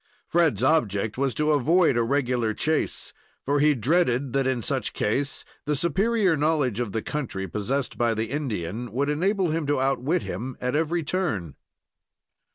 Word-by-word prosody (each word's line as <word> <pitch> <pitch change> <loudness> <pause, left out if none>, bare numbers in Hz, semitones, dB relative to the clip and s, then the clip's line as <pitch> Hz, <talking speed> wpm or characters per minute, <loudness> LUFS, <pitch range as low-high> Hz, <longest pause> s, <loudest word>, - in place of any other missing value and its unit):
Fred's 160 - +2
object 110 -8 +1
was 135 -1 -1
to 150 0 +1
avoid 160 +2 +3
a 120 - +2
regular 120 -3 0
chase, 155 0 -1 0.3
for 145 +1 +1
he 150 0 +4
dreaded 130 0 +1
that 135 -1 +1
in 125 -3 -1
such - - -1
case 135 +7 -1 0.2
the 150 - +1
superior 190 - +2
knowledge 145 -7 +1
of 120 -4 -2
the 110 0 -3
country 115 -10 -3
possessed 115 +8 -3
by 120 -1 +2
the 110 +1 -3
Indian 115 - -3
would 140 +4 0
enable 185 +3 +1
him 160 -2 -1
to 145 -2 +1
outwit 135 +5 0
him 120 +8 -5
at 125 +2 -1
every 165 +2 0
turn. 145 - -2
135 Hz, 165 wpm, -25 LUFS, 120-155 Hz, 0.3 s, he